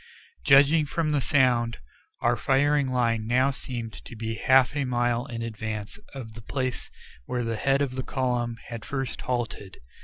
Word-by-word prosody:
Judging 145 +3 +6
from 155 +1 -1
the 145 -2 +2
sound, 125 -5 +2 0.4
our 120 0 +3
firing 140 +3 +2
line 115 -3 0
now 130 +3 +3
seemed 120 -4 -5
to - - -10
be 110 0 -3
half 130 +4 +4
a 145 - +1
mile 120 -1 0
in 115 -1 -5
advance 110 -2 -5 0.2
of 115 -5 -7
the 115 - -10
place 130 +2 -3 0.4
where 125 -1 -1
the 115 0 -2
head 135 +5 +2
of 130 -3 -3
the 130 - -3
column 125 -3 -1
had 115 -3 -6
first 135 0 -4
halted. 120 -6 -3
125 Hz, 165 wpm, -26 LUFS, 115-135 Hz, 0.4 s, Judging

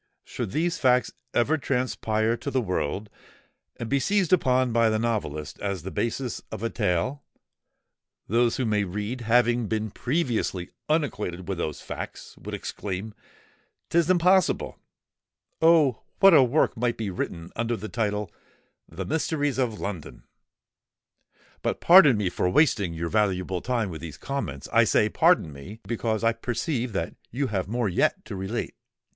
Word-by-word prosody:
Should - - -5
these 170 - -1
facts 125 -1 +3 0.2
ever 150 +6 +2
transpire 115 -4 0
to 140 - -5
the 135 - +1
world, 95 - -2 0.7
and 120 - -5
be 140 +3 +1
seized 195 +2 +1
upon 130 -7 +3
by 115 -1 +4
the 110 - +1
novelist 105 -10 -3
as 100 -5 -3
the 95 - -5
basis 120 +1 -2
of 105 - -6
a 115 - -1
tale, 110 +7 -1 1.0
those 115 +2 +2
who 130 - 0
may 105 -2 +1
read, 105 +6 -4
having 120 0 +2
been 110 -1 -2
previously 120 - -1 0.2
unacquainted 105 - -1
with 95 -3 -3
those 75 -3 -3
facts, - - -7
would - - -6
exclaim, 100 +2 -5 0.8
''Tis 170 0 +3
impossible!' 185 +1 +3 0.8
Oh! 160 -7 +4 0.2
what 195 -1 +8
a 150 - +8
work 130 +3 +2
might 120 0 -1
be 110 -3 -3
written, 85 -1 -5
under 120 0 -1
the 110 - -6
title 105 -3 -2 0.6
of 80 - -17
THE 95 - -3
MYSTERIES 145 -3 -1
OF 120 -5 -1
LONDON! 85 -11 -6 1.4
But - - -1
pardon 170 - +7
me 100 -4 0
for 90 - 0
wasting 100 - +2
your 85 +1 -3
valuable 95 -3 0
time 115 -6 -1
with 80 - -7
these 80 -4 -8
comments:—I 135 - 0
say, - - +3
pardon 75 - +3
me—because 110 - -4
I 115 0 +3
perceive 120 +1 -2
that - - -2 0.2
you 135 +3 -2
have 95 -2 -1
more 120 +1 -1
yet 90 - +1
to - - -6
relate." 95 +5 -3
115 Hz, 150 wpm, -26 LUFS, 95-130 Hz, 1.4 s, what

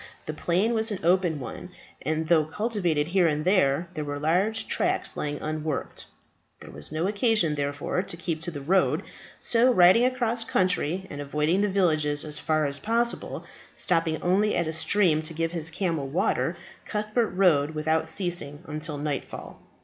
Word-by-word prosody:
The 155 - -4
plain 185 +8 +1
was 220 0 +1
an 205 - -2
open 175 -2 +2
one, 130 - -7 0.3
and 155 +2 -2
though 160 -2 +4
cultivated 170 -4 -1
here 180 -1 +3
and 150 0 -1
there, 170 -4 +2
there 155 - -3
were 145 0 -4
large 180 +9 0
tracts - - 0
lying 145 0 -3
unworked. 155 -1 -4 0.5
There - - -11
was - - -8
no 155 +2 -1
occasion 205 -5 +2
therefore 145 +4 -2
to 185 -3 -6
keep 165 -2 -3
to 170 - -2
the 145 -4 -7
road; 185 +7 +2 0.4
so 240 +2 +3
riding 185 +2 +6
across 240 -2 0
country, 185 -3 0
and 145 - -5
avoiding 150 +6 0
the 205 - +2
villages 155 -6 +1
as 150 -1 -2
far 155 -1 +1
as 140 0 -2
possible, 235 +2 -1 0.3
stopping 165 -3 +1
only 200 +4 +2
at - - +1
a 160 - -3
stream 160 -1 +3
to 160 +1 -5
give 165 0 -1
his 165 -2 -1
camel 165 -5 -2
water, 150 +7 0 0.3
Cuthbert 215 +2 -1
rode 160 -5 +2
without 160 +1 0
ceasing 175 -5 -3
until 155 -1 -5
nightfall. 145 -2 -5
165 Hz, 170 wpm, -26 LUFS, 150-195 Hz, 0.5 s, riding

